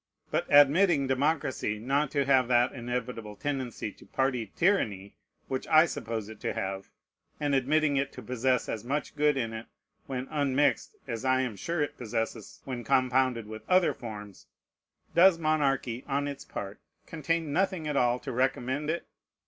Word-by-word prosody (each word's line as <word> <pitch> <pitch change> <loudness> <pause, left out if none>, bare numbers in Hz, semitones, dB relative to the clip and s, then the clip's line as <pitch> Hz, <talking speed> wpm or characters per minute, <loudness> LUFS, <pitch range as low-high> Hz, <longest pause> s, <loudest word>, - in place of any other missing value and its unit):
But - - 0
admitting 145 +2 +5
democracy 135 -5 0
not 135 +6 0
to 140 -1 0
have 130 -2 +4
that 120 0 +3
inevitable 120 -3 -5
tendency 130 -5 -3
to - - -18
party 125 -6 -1
tyranny 105 - +1 0.3
which 130 -1 -3
I 155 +1 +7
suppose 110 -8 -4
it 110 -1 -10
to - - -2
have, 95 0 -4 0.5
and 145 -1 0
admitting 145 +2 +2
it 135 0 0
to - - -9
possess 125 0 0
as 110 - -4
much 140 +5 -3
good 150 -1 +2
in 115 -3 -2
it 110 +1 -7 0.4
when 130 0 -4
unmixed 145 -1 +1
as 115 -1 -4
I 130 0 +3
am 125 -5 -3
sure 165 +8 -1
it 145 - -5
possesses 115 -2 -4
when 125 -3 -5
compounded 130 -2 +2
with 110 +1 -8
other 185 -1 +4
forms; 105 -4 -9 0.7
does 180 0 +6
monarchy, 140 -6 0
on 140 0 0
its 140 -1 -6
part, 100 +1 -7 0.3
contain 165 -1 -2
nothing 185 -3 0
at 150 - -2
all 125 -2 +3
to 135 - -5
recommend 130 +3 -1
it? 170 +2 -2
130 Hz, 165 wpm, -29 LUFS, 120-145 Hz, 0.7 s, I